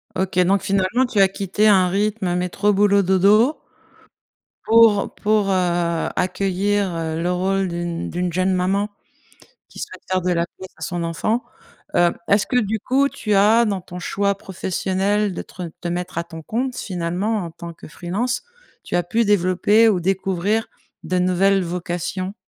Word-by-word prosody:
OK, 185 -1 -1
donc 190 +2 +3
finalement 195 +6 +1
tu 245 -4 -1
as 195 - +7
quitté 195 +2 0
un 185 -3 +5
rythme 200 -2 0
métro, 180 +3 0
boulot, 200 0 +4
dodo 205 - +4 1.1
pour 225 -2 +5
pour, 210 -1 +1
heu, 175 -3 0
accueillir, 195 +1 0
heu, 160 0 -3
le 175 - 0
rôle 190 +2 0
d'une 170 -1 -4
d'une 175 -1 -2
jeune 185 +1 +1
maman 195 +3 0 0.8
qui - - -15
souhaite 425 - -8
faire 185 0 +2
de 180 - 0
la 170 0 0
place 190 - -12
à - - -14
son 175 -2 -3
enfant. 215 +8 -1 0.5
Heu, 175 0 +4 0.2
est-ce 200 0 +3
que, 250 - -1
du 220 -1 0
coup, 275 +6 +1
tu 210 -6 -2
as 215 +4 +5
dans 200 -3 -1
ton 180 0 -10
choix 200 +2 -1
professionnel 195 +1 -1
de - - -4
te 185 - -10
re - - -3
te 175 - -4
mettre 180 0 -3
à 170 - -2
ton 165 -1 -10
compte, 245 +8 -3
finalement, 185 +4 -2
en 170 - -6
tant 170 +1 -9
que 165 - -13
freelance, 205 +11 -3 0.4
tu - - -7
as 175 - +2
pu 225 +7 0
développer 205 +3 +3
ou 200 - +2
découvrir 195 +4 0 0.4
de 185 - 0
nouvelles 185 +2 +2
vocations? 180 +2 -4
190 Hz, 170 wpm, -21 LUFS, 180-205 Hz, 1.1 s, as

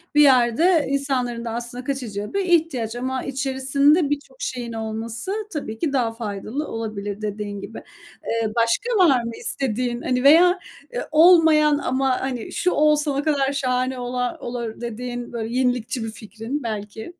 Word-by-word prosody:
bir 295 - +7
yerde 280 +5 +4
insanların 255 -4 -1
da 230 - -3
aslında 240 +2 -5
kaçacağı 235 - -4
bir 395 - +1
ihtiyaç 310 -10 +1
ama 260 +1 -3
içerisinde 275 +3 +2
birçok 290 +11 -4
şeyin 245 - -4
olması 225 - -4 0.2
tabii 220 -7 -4
ki 295 -4 -1
daha 235 -4 +1
faydalı 225 +5 -4
olabilir 215 -2 -5
dediğin 205 -1 -4
gibi. 225 - -8 0.5
Eee, 230 -1 0
başka 410 - +1
var 260 -6 +4
mı 230 - -4
istediğin, 245 -1 -2
hani, 250 0 0
veya, 355 +6 +6 0.3
eee, - - -2
olmayan 310 -2 +6
ama, 260 -1 0
hani, 255 -3 -4
şu 360 - 0
olsa 300 -1 +2
ne 285 - 0
kadar 280 -3 +1
şahane 255 -1 -1
ola 245 0 -2
olur 240 -2 -5
dediğin 240 +1 -5
böyle 230 0 -4
yenilikçi 245 -2 0
bir 225 - -4
fikrin 225 +6 -6
belki? 220 +6 -5
250 Hz, 155 wpm, -22 LUFS, 230-285 Hz, 0.5 s, bir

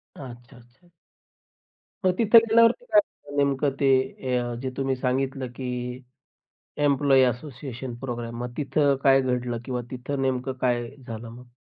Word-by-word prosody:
अच्छा, 120 -3 -11
अच्छा. 125 +9 -22 1.2
मग 185 - +5
तिथे 230 0 +6
गेल्यावरती 230 - +3
काय 320 -10 +5
झालं 145 - -12
नेमकं 140 0 +2
ते 140 - +2 0.5
अ, 120 -1 -2
जे 130 - -2
तुम्ही 135 -1 0
सांगितलं 130 +1 -1
की 130 0 -5 1.2
एम्प्लॉयी 140 -2 +4
असोसिएशन 125 0 -4
प्रोग्राम. 120 -2 -5
मग 125 0 -4
तिथं 140 0 +2
काय 135 -1 +6
घडलं 125 -2 -1
किंवा 125 -2 -3
तिथं 135 +2 -4
नेमकं 130 0 -1
काय 120 -2 +1 0.2
झालं 115 0 -7
मग? 120 +1 -13
130 Hz, 140 wpm, -25 LUFS, 125-140 Hz, 1.2 s, तिथे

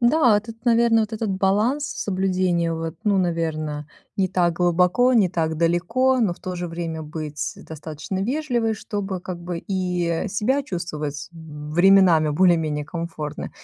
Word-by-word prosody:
Да, 240 -3 +4
тут, 225 +1 -12
наверное, 235 -1 +4
вот 215 0 -2
этот 220 -1 -2
баланс 205 +9 +1
соблюдения 185 -3 0
вот, 165 0 -4
ну, 205 -2 +2
наверно, 155 -4 -2 0.3
не 190 -1 +1
так 175 -2 +2
глубоко, 180 +8 +3
не 215 -6 +4
так 160 -2 -1
далеко, 175 +11 +2
но 210 -6 +2
в - - -12
то 185 - -5
же 175 -1 -4
время 165 -1 -4
быть 150 -1 -5
достаточно 160 +4 -6
вежливой, 240 -3 0
чтобы 200 -3 -4
как 180 -1 -6
бы 175 0 -4
и, 180 -1 -2
э, 170 +4 -1
себя 240 +8 0
чувствовать 155 - -5
временами 160 +2 +3
более-менее 155 -2 +2
комфортно, 160 -2 -5
180 Hz, 150 wpm, -23 LUFS, 165-210 Hz, 0.3 s, Да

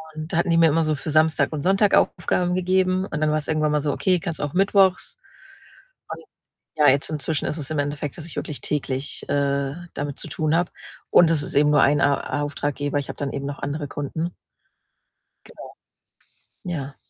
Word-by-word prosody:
Und 155 +1 -6
da - - +1
hatten 170 - +1
die 165 - +3
mir 165 - +6
immer 165 +2 +2
so 155 -1 0
für 150 - -6
Samstag 155 +1 +3
und 150 - -3
Sonntag 195 +2 +3
Aufgaben 180 +1 +1
gegeben 185 +1 +1
und 150 - -5
dann 155 0 +2
war's 155 -1 -1
irgendwann 155 -1 +1
mal 150 -1 +1
so: 145 - 0
„Okay, 185 +4 +1
kannst 165 -1 -5
auch 145 -1 -3
mittwochs.“ 195 -1 +2 0.9
Und - - -7 0.5
ja, 150 -1 +4
jetzt 140 +3 +2
inzwischen 155 0 -2
ist 150 - -3
es 145 -4 -5
im 155 - -1
Endeffekt, 145 0 -3
dass 160 - -8
ich - - -10
wirklich 150 - -5
täglich, 135 -2 -2
äh, 140 -1 0 0.2
damit 145 -1 -5
zu - - -4
tun 155 0 0
habe 175 +1 0 0.4
und 170 - +6
es 150 -3 +2
ist - - -5
eben 145 +1 +4
nur 145 -2 +5
ein 145 0 +3
A 145 +1 0
Auftraggeber, 145 0 -2
ich 140 - -7
habe - - -6
dann 140 -1 -3
eben 140 0 -4
noch 140 0 -5
andere 145 +1 -4
Kunden. 160 +5 -4 1.1
Genau. - - -12 1.0
Ja. 145 -7 -5
150 Hz, 200 wpm, -23 LUFS, 145-170 Hz, 1.1 s, mir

